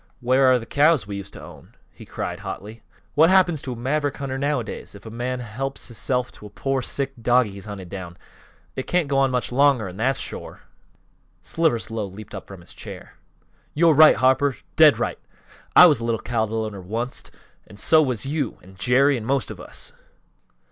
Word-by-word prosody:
Where 130 +1 +4
are 130 - +5
th' 115 - -8
cows 150 0 +4
that 105 - -13
we 100 - -4
used 100 0 -8
to - - -10
own?" - - -14 0.2
he - - -14
cried, - - -5
hotly. 110 +3 -8 0.3
"What 160 +3 +5
happens 180 -5 +4
to 130 - -5
a - - -8
maverick 140 +4 -1
hunter, 135 -1 -4
nowadays? 140 -8 -3
If 100 - -14
a 110 - -8
man 125 +2 -3
helps 130 +4 -5
hisself 125 +1 -1
to 105 - -12
a - - -13
pore, 135 +4 -2
sick 135 +1 -2
dogie 120 -2 +3
he's 100 +1 -10
hunted 100 -4 -8
down! 90 -3 -8 0.6
It 130 - -5
can't 175 -4 +1
go 140 -1 +1
on 135 -1 +3
much 125 -1 -2
longer, 135 -4 +3
an' 90 0 -9
that's 130 +4 +1
shore." - - -6 0.8
Slivers 155 -10 0
Lowe 110 -3 -3
leaped 100 +2 -11
up 95 - -8
from 95 -2 -11
his 85 - -12
chair. - - -10 0.6
"Yo're 165 +1 +5
right, 155 +2 +8
Harper! 130 0 +2 0.2
Dead - - +7
right! - - -2 0.6
I - - +11
was 150 -7 +5
a - - -6
little 115 -1 0
cattle 110 -1 -1
owner 100 -3 -7
onct, 115 +7 -4 0.5
so 155 +9 +4
was 125 -7 -1
you, 140 -3 -2
an' 95 +1 -16
Jerry, 135 +5 +3
an' 110 - -6
most 135 +1 0
of - - -9
us!" - - -10
125 Hz, 200 wpm, -23 LUFS, 110-140 Hz, 0.8 s, I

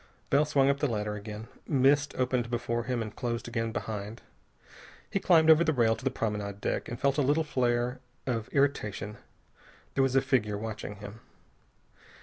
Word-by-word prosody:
Bell 145 +2 +5
swung 140 -2 +3
up 140 0 +2
the 145 - +2
ladder 105 -3 -2
again. 105 +1 -7 0.2
Mist 140 0 +3
opened 125 -2 0
before 120 -1 -1
him 120 -2 -1
and 110 -1 -8
closed 120 -1 -3
again 115 -1 -2
behind. 105 +1 -5 0.9
He 195 - +1
climbed 160 -4 +6
over 160 +1 +6
the 160 - +2
rail 115 -4 +3
to - - -12
the 135 - +2
promenade 105 -4 -3
deck, - - -2
and 120 - -5
felt 140 +1 +2
a - - +4
little 145 +4 +2
flare 125 -3 0 0.3
of 115 -4 -2
irritation. 105 -7 0 0.8
There - - +2
was 135 -1 +2
a 135 - +6
figure 105 -6 +1
watching 105 -1 -5
him. 105 +2 -10
120 Hz, 175 wpm, -29 LUFS, 110-140 Hz, 0.9 s, climbed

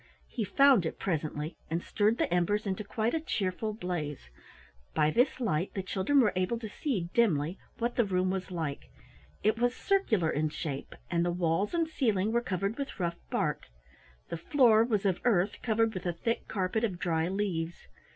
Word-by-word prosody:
He - - -2
found 260 +1 +5
it - - -5
presently 155 -2 -3
and 165 +2 -1
stirred 215 +2 +1
the 175 - 0
embers 205 +5 +1
into 195 +1 -2
quite 220 +3 -1
a 325 - +1
cheerful 215 - -2
blaze. 165 - -4 0.6
By 150 - +3
this 255 - +2
light 190 -7 -1
the 195 - -2
children 195 +9 +2
were 210 -6 +3
able 185 +6 0
to 225 -1 -6
see 200 - -2
dimly 175 -7 +2 0.2
what 240 +1 -2
the 240 - +5
room 185 -2 +1
was 190 0 -3
like. 160 -6 -4 0.5
It 215 +1 +2
was 245 +1 +2
circular 225 - +1
in 155 +1 0
shape 150 -2 -5 0.2
and 170 -1 +2
the 175 - +1
walls 175 - 0
and 335 -1 +2
ceiling 220 -9 +1
were 235 +1 +2
covered 195 +2 -2
with 275 -5 -5
rough 170 -2 -1
bark. - - -1 0.6
The 170 - -3
floor 225 - +5
was 215 -4 0
of 190 -3 +2
earth, 205 -5 +2
covered 225 -1 +1
with 185 -1 -4
a 175 - 0
thick 230 +7 -2
carpet 195 +2 -1
of 195 -6 0
dry 165 -3 0
leaves. 175 - -2
195 Hz, 185 wpm, -30 LUFS, 170-230 Hz, 0.6 s, found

